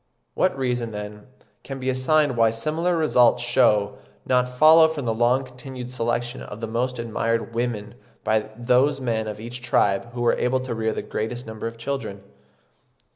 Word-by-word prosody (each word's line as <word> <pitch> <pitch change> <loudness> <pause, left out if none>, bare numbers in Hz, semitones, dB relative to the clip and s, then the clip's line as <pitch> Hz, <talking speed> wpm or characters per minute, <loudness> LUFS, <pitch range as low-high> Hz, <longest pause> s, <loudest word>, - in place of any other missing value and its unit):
What 185 -5 +1
reason, 125 -3 -1
then, 105 +1 -7 0.4
can 135 -1 -7
be 130 - -5
assigned 130 +2 +2
why 115 -1 +4
similar 155 +10 -1
results 125 -6 +3
should 105 -4 +3 0.3
not 125 -1 +2
follow 155 +5 +7
from 155 -4 -4
the 115 - +1
long 120 +4 +2
continued 125 -1 -9
selection 120 0 -2
of 105 - -8
the 115 - -3
most 125 +3 -2
admired 115 0 -2
women 115 -3 -3 0.3
by 110 0 0
those 125 +4 +2
men 115 -4 -1
of 105 -1 -6
each 120 +3 -7
tribe 115 -2 +1
who 120 -1 -3
were 120 - +4
able 130 +1 +1
to 130 -2 -4
rear 110 -1 -1
the - - -4
greatest 120 +3 -4
number 110 0 -5
of 115 0 -8
children? 115 -6 -5
120 Hz, 175 wpm, -23 LUFS, 115-130 Hz, 0.4 s, follow